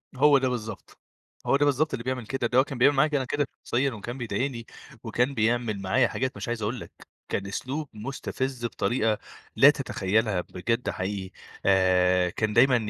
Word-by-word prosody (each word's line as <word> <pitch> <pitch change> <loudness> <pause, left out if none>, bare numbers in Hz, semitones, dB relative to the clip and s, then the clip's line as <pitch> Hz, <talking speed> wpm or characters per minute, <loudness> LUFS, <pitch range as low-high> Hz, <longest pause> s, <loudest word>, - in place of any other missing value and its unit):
هو 145 +2 +6
ده 130 -1 +1
بالضبط. 110 -4 -6 0.5
هو - - +3
ده 145 - +3
بالضبط 145 +2 +1
اللي 115 - -3
بيعمل 125 -3 -3
كده. 130 -1 -1
ده 120 - 0
هو - - +6
كان 135 -2 -7
بيعمل 140 +4 +5
معايا 145 +3 +4
أنا 135 -2 +1
كده 145 +3 0 0.2
شخصيًا، 135 +3 +1
وكان 120 +3 -6
بيضايقني 120 0 -3 0.4
وكان 125 +3 0
بيعمل 110 -3 0
معايا 105 +7 +3
حاجات 130 +2 -3
مش - - -5
عايز 120 -1 -3
أقول 110 +4 -2
لك، - - -10 0.4
كان 100 0 -2
أسلوب 135 +8 -4
مُستفِز 130 +2 -4
بطريقة 115 -2 0 0.4
لا - - +8
تتخيّلها 100 0 0
بجد 115 +8 -2
حقيقي، 95 0 -4 0.3
آآ 90 -1 +4
كان 105 +4 -1
دايمًا 125 +3 +5
120 Hz, 175 wpm, -26 LUFS, 105-135 Hz, 0.5 s, لا